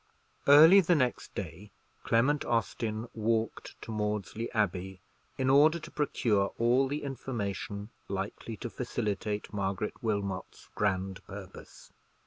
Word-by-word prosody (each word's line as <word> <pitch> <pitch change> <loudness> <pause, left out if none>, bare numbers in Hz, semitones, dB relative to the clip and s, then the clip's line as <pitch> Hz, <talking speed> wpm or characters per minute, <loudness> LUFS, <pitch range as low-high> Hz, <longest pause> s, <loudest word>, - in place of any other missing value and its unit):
Early 160 +7 +9
the 175 -2 +3
next 130 -5 -1
day 100 +5 -6 0.3
Clement 135 +6 +2
Austin 115 -1 -1
walked 115 0 -2
to - - -7
Maudesley 105 0 -2
Abbey, 95 -3 -1 0.4
in 130 - 0
order 145 +5 +6
to 170 - -10
procure 110 -9 +1
all 125 +3 +3
the 145 +2 -3
information 105 -5 -4 0.2
likely 100 +3 -4
to 120 - -5
facilitate 105 -4 -3
Margaret 100 0 -2
Wilmot's 100 -4 -3
grand 95 -2 -1
purpose. 95 -1 -11
110 Hz, 115 wpm, -30 LUFS, 100-130 Hz, 0.4 s, Early